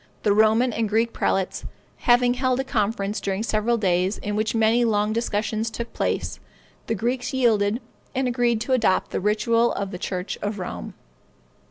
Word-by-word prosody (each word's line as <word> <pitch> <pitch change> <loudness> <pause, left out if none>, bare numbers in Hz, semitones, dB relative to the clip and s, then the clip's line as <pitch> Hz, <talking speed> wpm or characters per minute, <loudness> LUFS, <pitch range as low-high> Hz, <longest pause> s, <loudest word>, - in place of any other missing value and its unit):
The 205 - +3
Roman 220 +3 +4
and 220 -1 -1
Greek 225 +2 +1
prelates 190 -1 -1 0.3
having 245 0 +4
held 255 0 0
a - - +1
conference 210 -4 -1
during 195 +1 -2
several 230 +1 +1
days, 185 -1 +1
in 210 0 -4
which 215 +2 0
many 225 +2 +3
long 210 -2 +1
discussions 220 0 -1
took 235 +1 -6
place, - - -2 0.5
the 225 - 0
Greeks 245 +5 -2
yielded, 220 -3 +2 0.4
and 265 0 +1
agreed 240 -2 +1
to 260 - 0
adopt 225 -7 +2
the - - -1
ritual 230 +4 +2
of 200 -1 -3
the 180 - -6
church 180 +1 -4
of 205 0 -3
Rome. 180 - -6
220 Hz, 170 wpm, -24 LUFS, 205-240 Hz, 0.5 s, Roman